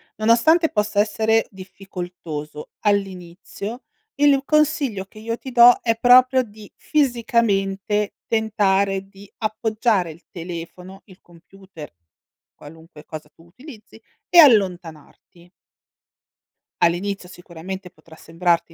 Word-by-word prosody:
Nonostante 235 +10 +3
possa 210 -1 -1
essere 220 +1 +1
difficoltoso 180 -6 -9
all'inizio, 200 +3 -4 0.3
il 285 -1 +3
consiglio 290 -10 0
che 215 - -16
io 230 +1 -4
ti 260 - -9
do 240 0 +7
è 230 -1 +1
proprio 255 +2 +5
di 215 -3 -12
fisicamente 210 -7 -1
tentare 200 -3 0
di 195 0 -17
appoggiare 215 -3 -1
il 165 +2 -17
telefono, 180 +2 -9
il 190 -3 -19
computer, 175 - -15 0.6
qualunque 160 0 -15
cosa 155 -1 -10
tu 165 - -23
utilizzi 230 - -15 0.3
e 350 - +2
allontanarti. 175 - +1 1.3
All'inizio 180 +2 -1
sicuramente 180 +1 -9
potrà 165 -2 -19
sembrarti 170 0 -1
195 Hz, 105 wpm, -21 LUFS, 175-225 Hz, 1.3 s, do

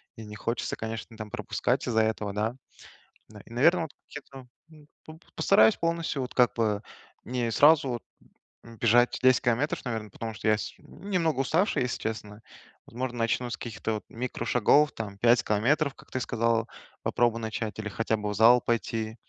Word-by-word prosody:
и 115 - -9
не 105 0 -9
хочется, 115 +2 -3
конечно, 110 -2 -6
там 110 -1 -7
пропускать - - -1
из-за 110 -2 +2
этого, 105 -2 -2
да. 110 +4 -1 0.7
Да. 105 -1 -13
И - - -17
наверно 165 +8 +3
от 150 - -11 0.2
кето 135 -2 -11 0.2
м, 150 -2 -17 0.2
п 155 - -10 0.2
постараюсь 110 -8 +5
полностью 165 -4 -1
вот 125 - -5
как 125 -2 +4
бы 105 -3 0 0.4
не 120 -1 -2
сразу 145 +4 +5
вот, 120 -2 -4 0.6
м, 115 0 -13
бежать 120 +2 +3
10 130 -2 +5
километров, 120 +5 0
наверно, 110 -3 -4
потому 110 +1 -6
что 110 - -5
я 110 - +4
с - - -6
немного 170 -8 -2
уставший, 160 +3 +1
если 125 - -2
честно. 105 -1 -5 0.4
Возможно, 125 +1 -5
начну 120 +2 0
с - - -4
каких-то 110 -1 -4
вот 105 - -4
микрошагов, 125 +4 +2
там, 100 -3 -7
5 115 +2 +4
километров, 140 +8 +1
как - - -18
ты 130 - -2
сказал, 115 -1 0 0.3
попробую 120 -1 +1
начать, 110 -1 -4
или 110 - -4
хотя 110 +1 -1
бы 105 0 -3
в 105 - -2
зал 120 +3 +6
пойти, 115 -1 -2
115 Hz, 175 wpm, -27 LUFS, 110-130 Hz, 0.7 s, зал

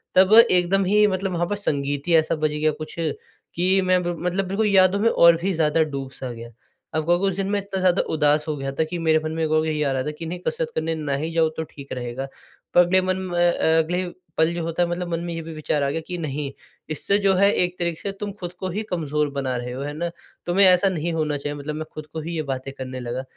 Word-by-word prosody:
तब 190 +2 +6 0.2
एकदम 185 +2 +4
ही 210 +3 +4
मतलब 190 -1 -2
वहाँ 175 0 0
पर 205 - -2
संगीत 145 -7 -2
ही 170 - +4
ऐसा 160 0 +3
बज 155 -1 0
गया 155 +1 +2
कुछ, 155 +1 -8
कि 175 +4 -1
मैं 185 -1 +2
बिल 175 0 -1
मतलब 180 +2 -1
बिल्कुल 205 +3 0
यादों 190 -1 +4
में 225 +3 +3
और 170 -5 +6
भी 195 +2 0
ज़्यादा 160 -1 +2
डूब-सा 135 -3 -6
गया। 115 0 -9 0.5
आप 155 - +1
कहोगे 175 +3 +2
उस 195 - -1
दिन 195 0 -2
मैं 205 0 +1
इतना 195 -1 -5
ज़्यादा 185 0 +3
उदास 150 -1 +3
हो 155 - -1
गया 135 0 -3
था, 140 +4 0
कि 165 +3 -4
मेरे 160 -1 +3
मन 155 - -2
में 160 0 0
वो 155 0 +2
भी 160 - -1
नहीं 150 -1 0
आ 140 - +1
रहा 130 -1 -1
था 150 - -3
कि 165 - -5
नहीं 175 +2 -5
कसरत 475 0 -1
करने 165 0 -1
ना 150 -3 -3
ही 160 +3 -3
जाऊँ 165 -1 +3
तो 160 - -1
ठीक 140 -1 -12
रहेगा। 125 +1 -5 0.5
पर 175 - +7
अगले 185 +2 +3
मन 185 0 -1
म - - -6
अ, - - -1 0.4
अगले 165 +2 0
ही 180 - -5 0.3
पल 160 +1 +3
जो 170 - -3
होता 165 +2 0
है 170 - -1
मतलब 175 +1 -3
मन 165 - -1
में 170 -1 -4
ये 165 - -4
भी 165 0 -8
विचार 155 -1 -1
आ 140 - +1
गया 160 +3 -2
कि 180 - -5
नहीं, 150 -3 -4 0.4
इससे 155 +6 +1
जो 195 -1 +3
है 200 +2 +4
एक 180 0 +1
तरीके 170 -2 -1
से 200 - -3
तुम 205 -1 -4
खुद 175 -1 -6
को 185 - -3
ही 205 +5 -3
कमज़ोर 150 -3 -1
बना 135 -2 -2
रहे 120 0 -5
हो। 130 - -5
है 145 +1 -4
ना? 170 +3 -3 0.4
तुम्हें 190 +3 +4
ऐसा 185 +1 +5
नहीं 170 -2 -2
होना 155 -2 -1
चाहिए 145 +1 -4
मतलब 150 +1 -5
मैं 155 +1 -4
खुद 155 - -7
को 160 - -4
ही 170 +2 -5
ये 160 - -1
बातें 135 -1 -4
करने 130 -1 -6
लगा 125 +1 -4
165 Hz, 270 wpm, -23 LUFS, 150-185 Hz, 0.5 s, पर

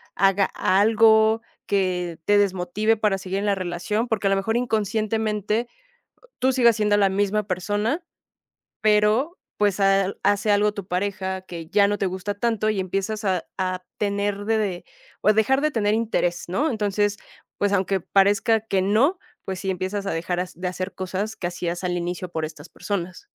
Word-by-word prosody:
haga 195 0 +3
algo 220 +2 +4 0.3
que 180 -4 -1
te 205 0 +4
desmotive 200 +3 +1
para 210 -2 +1
seguir 190 +1 -3
en 205 - -2
la 200 - +2
relación? 185 +5 -2
Porque 210 -3 0
a - - +3
lo 195 - +3
mejor 225 +4 -1
inconscientemente, 220 -1 -1 0.7
tú 260 - +3
sigues 235 -3 +5
siendo 210 -1 +2
la 200 -1 +4
misma 205 +2 0
persona, 205 - -1 0.8
pero, 215 - +2 0.2
pues, 205 -2 +2
ha 195 0 +3
hace 205 +1 +2
algo 205 +1 +3
tu 200 -2 -8
pareja 190 0 -2
que 170 -3 -8
ya 200 -1 +4
no 205 - -1
te 195 - 0
gusta 185 +2 -3
tanto, 215 0 0
y 200 -3 -1
empiezas 195 +4 -3
a 185 -3 0
a 185 -1 -2
tener 205 0 -1
de 225 0 +2
de 190 -5 -2 0.4
o 210 - +4
dejar 240 +6 +2
de 305 +1 +1
tener 210 -4 +1
interés, 215 -6 -1
¿no? 275 - 0
Entonces, 205 -2 0 0.4
pues, 205 0 +1
aunque 190 0 +1
parezca 200 +4 +3
que 195 -3 -1
no. 245 - +2 0.3
Pues 190 -1 -4
sí, 190 0 -2
empiezas 190 +2 -3
a - - -1
dejar 175 +2 -2
de 180 +2 -3
hacer 185 +1 -5
cosas 190 +3 -3
que 175 -4 -3
hacías 175 0 -4
al 180 -1 -1
inicio 175 +1 -3
por 160 -2 -3
estas 155 0 -8
personas. 185 - -5
200 Hz, 175 wpm, -23 LUFS, 185-215 Hz, 0.8 s, sigues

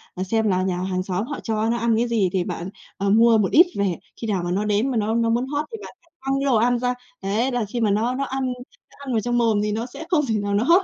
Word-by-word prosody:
ờ, 185 - -2
xem 220 +3 0
là 185 -2 +1
nhà 185 -1 -1
hàng 185 0 -2
xóm 185 +2 -2
họ 290 - -5
cho 220 -1 0
nó 235 - +1
ăn 230 -1 +1
cái 235 +2 +1
gì 220 -6 +1
thì 185 -2 +1
bạn, 175 +1 -5 0.3
ờ, 200 0 0
mua 225 +2 +5
một 205 -3 +1
ít 340 +4 +8
về. 200 -3 +1 0.3
Khi 225 - -3
nào 195 -5 0
mà 175 - -2
nó 200 +3 0
đến 210 +5 +1
mà 245 - -1
nó 220 +1 0
nó 230 -1 +2
muốn 240 +3 +1
hót 290 +2 -2
thì 450 - -5
bạn - - -9 0.3
quăng 270 0 -1
cái 275 - -1
đồ 270 -3 +3
ăn 240 +2 +3
ra. 250 0 0 0.3
Đấy, 215 +7 0
là 245 -3 -1
khi 220 +4 -4
mà 215 -2 +3
nó 225 +5 +1
nó 275 - -1
ăn 270 -1 -2 0.5
nó - - -20
ăn 265 - -4
vào 225 - +2
trong 240 +2 0
mồm 225 -3 +3
thì 210 - -1
nó 225 +3 -2
sẽ 260 +6 -9
không 310 -5 +2
thể 225 - 0
nào 205 0 -2
nó 205 +3 +2
hót 345 +8 +5
225 Hz, 310 wpm, -23 LUFS, 200-245 Hz, 0.5 s, ít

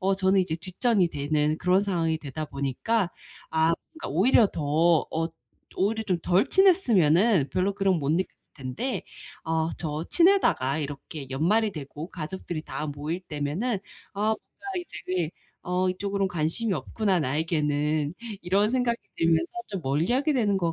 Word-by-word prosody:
어 195 0 +2
저는 190 0 +3
이제 165 -3 -1
뒷전이 185 +2 +1
되는 150 +1 0
그런 185 +2 +3
상황이 165 -5 0
되다 155 +1 -5
보니까 170 - -1 0.4
아 160 +1 +3 0.2
그러니까 335 0 -7
오히려 215 +5 +5
더 160 +1 +2
어 165 +1 0 0.5
오히려 220 +4 +1
좀 180 -4 0
덜 180 +3 +3
친했으면은 220 - +4
별로 190 +2 +1
그런 195 -2 +2
거 - - -5
못 140 +1 0
느꼈을 180 +4 -3
텐데 135 - -3 0.4
아 160 0 0
저 155 0 -3
친하다가 335 - +3
이렇게 145 0 -6
연말이 205 +10 +2
되고 150 +2 -7
가족들이 170 -1 -5
다 155 - -5
모일 150 +5 -4
때면은 175 - -2 0.3
아 200 - -6 0.2
뭔가 - - -27
이제 350 - -8
네. 175 -3 0 0.4
'어 180 +1 +1
이쪽으로는 195 +1 -1
관심이 180 +6 0
없구나 195 -6 0
나에게는.' 150 +1 0 0.3
이런 195 +4 +2
생각이 245 -2 +1 0.2
들면서 165 - +2 0.2
좀 195 -4 -4
멀리하게 240 - +1
되는 205 -6 +2
것 170 -2 0
175 Hz, 325 characters per minute, -26 LUFS, 155-200 Hz, 0.5 s, 오히려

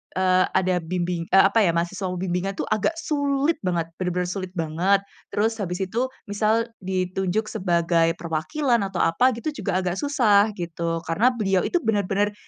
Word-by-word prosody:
eee, 185 0 +3
ada 185 -1 +2
bimbing, 175 0 -2
eee, 195 - +6
apa 225 - +2
ya, 170 - +3
mahasiswa 185 +3 -2
bimbingan 180 +2 -2
itu - - -2
agak 215 - +1
sulit 285 0 0
banget, 170 -2 0
bener-bener 180 0 -1
sulit 185 -1 -4
banget. 175 +4 +1 0.3
Terus 225 +2 +1
habis 180 -1 -3
itu, 230 +7 -1 0.2
misal 220 +3 +1 0.2
ditunjuk 190 +2 -1
sebagai 170 -4 +2
perwakilan 230 - 0
atau 190 -2 -5
apa 250 +10 +3
gitu, 305 +6 -3
juga 190 -5 -1
agak 180 0 -2
susah 220 -8 +3
gitu, 165 -1 -3
karena 210 +10 +3
beliau 195 -4 +1
itu - - +1
bener-bener 205 -1 +1
190 Hz, 160 wpm, -24 LUFS, 175-220 Hz, 0.3 s, eee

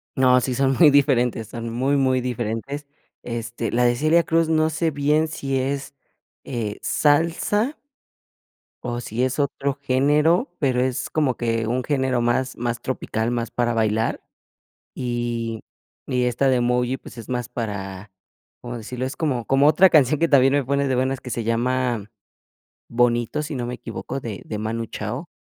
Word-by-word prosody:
No, 125 -1 +5
sí 125 0 -2
son 135 +1 +2
muy 165 -4 +8
diferentes, 125 -6 +2
son 115 +1 -6
muy, 130 +5 +1
muy 130 -2 +2
diferentes. 125 +4 -4 0.4
Este, 120 -1 -4
la 125 +1 +2
de 120 0 +3
Celia 155 +6 +3
Cruz 165 0 +1
no 155 0 +3
sé 160 +1 0
bien 150 +2 +2
si 135 -3 -2
es, 140 +1 -3 0.5
eh, 110 -5 -4
salsa 170 - +1 1.1
o 120 -1 -3
si 120 +1 -2
es 130 +2 -1
otro 140 0 0
género, 150 - +2
pero 130 -3 +1
es 130 0 -1
como 145 -5 +1
que 115 -1 -1
un 125 +3 -1
género 130 -3 0
más 125 +2 0
más 120 0 -2
tropical, 115 -3 -2
más 120 -2 -2
para 120 -1 0
bailar. 110 0 0 0.7
Y 120 -2 -3 0.5
y 125 -1 +1
esta 125 +2 +1
de 130 - +3
Emoji, 125 +1 +1
pues, 125 - -13
es 115 - -9
más 125 -1 -3
para, 100 -4 -5 0.5
¿cómo 120 0 -6
decirlo?, 125 +3 -5
es 130 - -5
como 130 -8 -1
como 135 +2 +4
otra 185 +5 +6
canción 150 -2 +4
que 165 - +3
también 135 -3 +5
me 145 -1 +2
pone 140 +1 +1
de 130 - +1
buenas 130 +1 0
que 125 - -8
se 120 -1 -2
llama 120 -1 0 0.8
Bonito, 120 +4 +1
si 150 0 -5
no 125 -2 -3
me 125 - -4
equivoco, 135 - -6
de 110 -7 -6
de 105 - -5
Manu 115 +2 -3
Chao. 110 - -5
125 Hz, 170 wpm, -23 LUFS, 120-140 Hz, 1.1 s, muy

